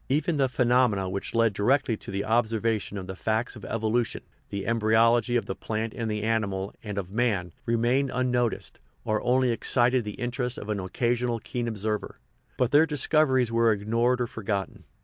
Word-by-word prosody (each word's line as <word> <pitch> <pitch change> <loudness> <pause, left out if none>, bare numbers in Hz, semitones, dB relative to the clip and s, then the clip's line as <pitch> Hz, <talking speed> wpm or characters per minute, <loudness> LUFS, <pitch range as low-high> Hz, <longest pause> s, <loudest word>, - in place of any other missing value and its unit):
Even 150 +4 +1
the 135 -2 +2
phenomena 120 -5 +2
which 95 +4 -4
led 115 -2 +3
directly 125 +4 +2
to - - -11
the 100 0 -2
observa 115 -1 +1
tion 100 - -7
of 95 - -5
the 95 0 -6
facts 110 +5 -1
of 110 - -11
evolution 115 +1 -1 0.3
the 100 -1 -4
embryology 115 +1 +3
of 120 - +1
the - - -3
plant 110 +2 -4
and 115 -2 -3
the 105 -1 -2
animal, 100 -3 -1
and 105 -2 -6
of 95 -2 -4
man 105 -6 0 0.2
remained 120 +4 +2
un 125 0 0
noticed, 120 -3 -1 0.3
or 110 0 0
only 125 0 +2
excited 120 +1 +2
the 105 -1 -6
interest 125 0 -3
of 105 - -7
an 105 -1 -1
occasional 120 +5 -1
keen 120 +2 -4
observer; 105 -1 -3 0.4
but 125 -1 +1
their 150 +3 +5
discoveries 135 -4 +2
were 115 0 +4
ignored 115 +4 +1
or 125 - +1
forgotten. 105 -3 -4
115 Hz, 185 wpm, -27 LUFS, 105-125 Hz, 0.4 s, their